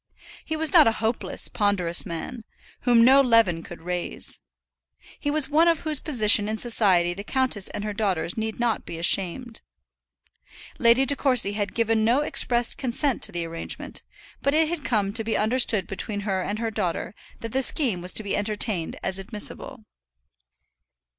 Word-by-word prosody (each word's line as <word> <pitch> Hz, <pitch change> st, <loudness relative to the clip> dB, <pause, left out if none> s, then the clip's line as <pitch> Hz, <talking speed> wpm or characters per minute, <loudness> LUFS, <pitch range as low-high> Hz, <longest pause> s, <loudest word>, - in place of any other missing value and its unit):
He 315 Hz, -, -4 dB
was 315 Hz, +3 st, -2 dB
not 320 Hz, -7 st, +6 dB
a 225 Hz, -, +2 dB
hopeless, 225 Hz, +2 st, -2 dB
ponderous 185 Hz, -5 st, 0 dB
man, 175 Hz, +8 st, -7 dB, 0.4 s
whom 235 Hz, -2 st, +4 dB
no 270 Hz, +2 st, +6 dB
leaven 230 Hz, -10 st, +2 dB
could 170 Hz, 0 st, -12 dB
raise. 180 Hz, 0 st, -4 dB, 0.8 s
He 290 Hz, -, -3 dB
was 300 Hz, -1 st, +2 dB
one 310 Hz, +4 st, +2 dB
of 335 Hz, -2 st, +1 dB
whose 310 Hz, -3 st, -1 dB
position 215 Hz, -7 st, +3 dB
in 220 Hz, -, -3 dB
society 190 Hz, -7 st, +2 dB
the 200 Hz, +3 st, -8 dB
countess 255 Hz, -4 st, -1 dB
and 205 Hz, -, -6 dB
her 210 Hz, 0 st, -4 dB
daughters 190 Hz, -5 st, -2 dB
need 220 Hz, 0 st, -5 dB
not 235 Hz, -2 st, -1 dB
be 165 Hz, -, -8 dB
ashamed. 195 Hz, +7 st, +1 dB, 1.2 s
Lady 240 Hz, +2 st, +4 dB
De 285 Hz, -, 0 dB
Courcy 255 Hz, -7 st, +3 dB
had 205 Hz, -1 st, -4 dB
given 225 Hz, -1 st, 0 dB
no 240 Hz, +6 st, +2 dB
expressed 240 Hz, -5 st, +1 dB
consent 265 Hz, +1 st, 0 dB
to -, -, +4 dB
the 170 Hz, -1 st, -3 dB
arrangement, 165 Hz, 0 st, -5 dB, 0.4 s
but 280 Hz, +1 st, 0 dB
it 315 Hz, 0 st, +2 dB
had 335 Hz, -3 st, -5 dB
come 205 Hz, -4 st, -1 dB
to 225 Hz, 0 st, -2 dB
be 220 Hz, 0 st, -2 dB
understood 220 Hz, -3 st, +3 dB
between 205 Hz, +2 st, -4 dB
her 195 Hz, -2 st, -2 dB
and 205 Hz, +3 st, -4 dB
her 225 Hz, 0 st, -3 dB
daughter 190 Hz, -5 st, -4 dB, 0.3 s
that 230 Hz, -, -6 dB
the 265 Hz, -, 0 dB
scheme 245 Hz, -, +4 dB
was 180 Hz, +1 st, 0 dB
to 220 Hz, -, +2 dB
be 200 Hz, -, -2 dB
entertained 205 Hz, -4 st, -2 dB
as 190 Hz, -, -3 dB
admissible. 205 Hz, +2 st, -1 dB
220 Hz, 175 wpm, -23 LUFS, 195-255 Hz, 1.2 s, not